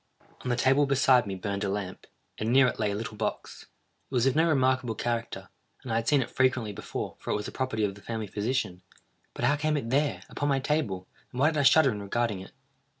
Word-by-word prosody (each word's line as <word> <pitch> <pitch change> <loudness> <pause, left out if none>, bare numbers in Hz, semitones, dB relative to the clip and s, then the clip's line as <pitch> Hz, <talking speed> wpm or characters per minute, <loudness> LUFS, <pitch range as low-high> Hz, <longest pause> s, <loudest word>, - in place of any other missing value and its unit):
_" - - -31 0.2
On 125 - -4
the 120 - +2
table 135 +3 +3
beside 130 -3 +4
me 95 - -3
burned 100 +2 -3
a 100 - 0
lamp, 95 -2 -5 0.3
and 110 +2 -1
near 135 +1 +6
it 125 - -1
lay 105 -2 +1
a 100 - -2
little 110 +1 -5
box. - - -4 0.4
It 135 - -5
was 120 0 +3
of 135 - +2
no 165 +2 +4
remarkable 130 -5 +2
character, 120 +1 -3 0.3
and 130 - -6
I - - +2
had 115 0 -2
seen 145 -3 +4
it - - -11
frequently 130 -5 +1
before, - - -5
for - - -8
it - - +1
was 105 - -3
the - - -5
property 130 -5 -2
of 100 -2 0
the 100 - -15
family 110 0 -4
physician; 105 -3 -2 0.5
but - - -1
how 145 - +4
came 155 +1 0
it 115 -5 -4
there, 145 +2 +1
upon 145 - -2
my 135 - +3
table, 125 -11 -1 0.2
and 125 - -6
why 150 +4 +4
did 155 - -1
I - - +4
shudder 135 +1 +6
in 105 -2 -5
regarding 105 0 -1
it? 95 - -11
120 Hz, 250 wpm, -28 LUFS, 105-135 Hz, 0.5 s, near